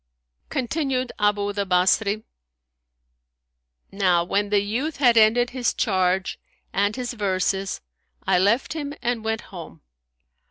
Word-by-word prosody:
Continued 260 -1 -1
Abu 205 -1 +1
the 200 0 -1
Basri, 200 +3 +2 1.7
"Now 185 -3 +2
when 200 +3 -1
the 205 0 +3
youth 255 +10 -3
had 245 -4 +4
ended 230 +2 +4
his 250 -2 -1
charge 185 -3 0 0.3
and 205 +1 +1
his 250 -1 -4
verses 195 -2 -1 0.4
I 180 - +3
left 215 +11 +2
him 290 -2 -5
and 240 -2 -1
went 220 0 -2
home. 165 - -11
210 Hz, 120 wpm, -23 LUFS, 195-245 Hz, 1.7 s, had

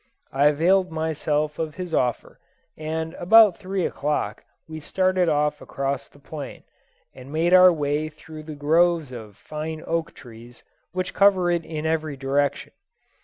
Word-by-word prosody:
I 140 +2 +3
availed 180 +5 +2
myself 155 -1 -2
of 155 -2 -3
his 180 -3 -6
offer, 125 -5 -1 0.4
and 160 +1 -4
about 210 +1 +6
three 190 -2 -2
o'clock 150 +2 -2 0.2
we 160 0 -7
started 185 +2 +1
off 150 -1 0
across 135 -3 -4
the - - -21
plain, 145 0 -9 0.5
and 130 +2 -12
made 165 +3 +1
our 185 0 +8
way 150 -1 -1
through 155 0 -12
the 155 0 -9
groves 160 0 +2
of 110 -5 -10
fine 155 +1 -6
oak 165 0 -2
trees 120 -2 -14 0.3
which 185 0 -3
cover 190 -3 +4
it 170 -1 0
in 155 -1 -5
every 155 -3 -1
direction. 140 +1 -1
155 Hz, 150 wpm, -23 LUFS, 145-175 Hz, 0.5 s, our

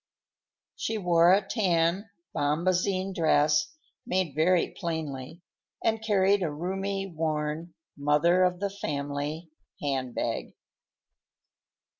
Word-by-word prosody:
She 225 - -2
wore 175 -3 +4
a 195 +1 +3
tan 185 -1 +1 0.3
bombazine 185 +5 +1
dress, 155 -2 +3 0.4
made 185 -5 -1
very 170 +4 +2
plainly, 160 -2 -5 0.4
and 220 -1 +1
carried 200 -2 +3
a 170 - 0
roomy, 195 +5 -3
worn, 160 -1 -3 0.2
mother 150 +5 +3
of 180 -1 +2
the 200 0 -2
family 145 -2 -4 0.3
handbag. 130 -3 -2
170 Hz, 95 wpm, -28 LUFS, 150-190 Hz, 0.4 s, wore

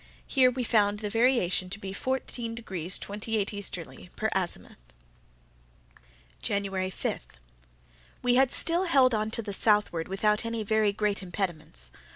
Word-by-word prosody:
Here 260 -2 +4
we 250 0 -3
found 210 -3 +3
the 210 -1 -4
variation 225 -6 +2
to 200 - -3
be 195 -2 -7
14 240 -1 -3
degrees 190 -6 -2
28' 210 0 -2
easterly, 185 -3 -4
per 220 - -1
azimuth. 185 - -1 1.6
January 195 -2 -1
5.—We - - -6
had 265 +1 +4
still 345 +3 +4
held 270 -7 +4
on 215 0 0
to 230 +1 -2
the 205 -1 -5
southward 205 -6 +2
without 210 +3 +1
any 230 -1 -3
very 215 0 +2
great 205 0 0
impediments. 165 - -4
205 Hz, 135 wpm, -28 LUFS, 185-230 Hz, 1.6 s, Here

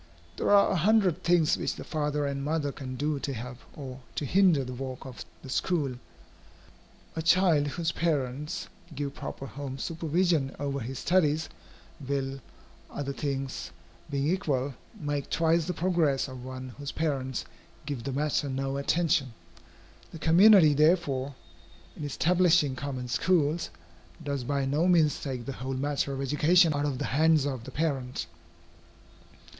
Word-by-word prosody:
There - - -1
are 200 -1 +6
a - - +1
hundred 195 -1 +3
things 170 -2 +3
which - - -2
the - - -7
father 150 -2 -1
and 140 -1 -2
mother 150 -1 -1
can 130 -2 -7
do 145 +2 -1
to 140 - -3
help 125 +1 -7 0.2
or 130 -3 -7 0.2
to 150 - -2
hinder 180 -2 +4
the 125 0 -6
work 130 +1 -6
of 130 -2 -8 0.2
the - - -9
school. 150 -7 0 1.2
A 160 - -1
child, 165 -3 +4
whose 165 +3 -1
parents 150 -3 -2 0.3
give 140 0 -3
proper 135 - -6
home 135 0 -6
supervision 165 -1 0
over 140 -1 -2
his 130 +2 -5
studies, 155 -1 +2 0.5
will, 135 -1 -3 0.5
other 140 -1 -4
things 135 -2 -3 0.4
being 140 0 -1
equal, 145 -7 0 0.3
make 145 -2 -3
twice 165 0 +2
the 180 - -2
progress 160 -7 +1
of 130 -2 -9
one 130 0 -7
whose 145 0 -4
parents 135 -5 -2 0.4
give 140 -5 -4
the 140 - -3
matter 145 +1 0
no 135 +1 -2
attention. 140 -4 +1 0.8
The - - -8
community, 170 0 +7
therefore, 145 -3 +2 0.6
in - - -7
establishing 165 -1 +3
common 130 -2 -4
schools, 165 +3 +1 0.5
does 140 -3 -2
by 140 0 0
no 150 +6 +1
means 165 -5 +3
take 130 -4 -4
the 135 - -4
whole 130 +1 -3
matter 140 +1 -1
of 135 0 -3
education 155 +5 +4
out 145 0 0
of 135 -3 -2
the - - -2
hands 155 0 +4
of 130 -5 -3
the - - -8
parent. 135 -5 -2
145 Hz, 150 wpm, -28 LUFS, 135-160 Hz, 1.2 s, community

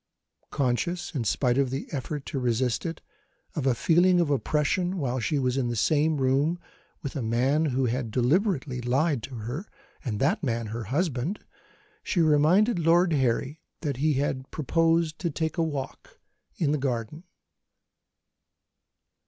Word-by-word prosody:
Conscious, 160 +8 -1
in 135 -6 -1
spite 125 +3 +1
of 135 -2 +2
the 135 +2 -3
effort 145 0 -4
to 135 - -3
resist 125 +4 0
it, 165 - -6 0.5
of 140 -4 -1
a 125 - +3
feeling 175 +7 +4
of 165 -4 +1
oppression 150 - 0
while 130 -5 -1
she 120 +6 0
was 130 -1 0
in 130 -3 +1
the 120 - -2
same 155 +6 +2
room 140 +5 +2 0.5
with 140 - -5
a 140 - -2
man 130 +7 +1
who 130 -2 +1
had 120 0 -1
deliberately 135 - +1
lied 135 +3 +1
to 130 +3 -8
her, 120 - -5 0.4
and 110 -7 -3
that 140 +6 +1
man 115 -6 -1
her 115 -1 -4
husband, 150 - -1 0.6
she 180 - -1
reminded 170 +8 +4
Lord 170 +1 +4
Harry 135 +2 0 0.2
that 145 -5 -2
he 150 +3 +2
had 135 -1 -2
proposed 165 +1 +1
to 175 - -1
take 160 +3 -2
a - - +3
walk 145 -4 -5 0.4
in 150 -4 +1
the 150 - 0
garden. 130 +3 -3
140 Hz, 155 wpm, -27 LUFS, 125-160 Hz, 0.6 s, feeling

